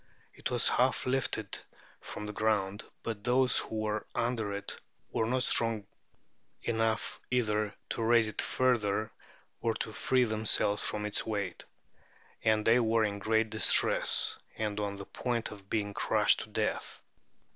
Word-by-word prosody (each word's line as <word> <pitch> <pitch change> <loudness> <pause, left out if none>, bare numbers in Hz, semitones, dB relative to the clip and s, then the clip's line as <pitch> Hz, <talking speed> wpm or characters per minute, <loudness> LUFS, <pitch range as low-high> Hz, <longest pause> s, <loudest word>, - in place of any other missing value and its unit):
It - - -4
was 120 -1 +2
half 130 +1 +2
lifted 125 -5 -1 0.4
from 105 - -7
the 105 - -5
ground; 105 -2 0 0.2
but 110 -3 -4
those 125 +1 +3
who 110 -1 -4
were 105 0 -2
under 115 -3 -1
it 100 0 -2 0.4
were 110 - 0
not 125 +1 +1
strong 115 -4 +1 0.8
enough 115 -1 -1
either 105 -4 0
to - - -3
raise 115 0 +4
it 110 - +1
further 110 -5 +1 0.5
or 115 -1 0
to 110 - -4
free 130 +3 +2
themselves 110 -2 +1
from 105 0 -1
its 105 - -1
weight. 100 -5 -4 0.8
And 110 -1 +2
they 115 +2 +5
were 115 -1 +2
in 100 -1 -1
great 110 +1 +1
distress, 110 - +4 0.2
and 105 -1 -2
on 100 -1 -2
the 100 0 -8
point 120 +1 -3
of 100 -2 -12
being 100 -2 -1
crushed - - +3
to - - -6
death. - - -2
110 Hz, 150 wpm, -31 LUFS, 105-115 Hz, 0.8 s, they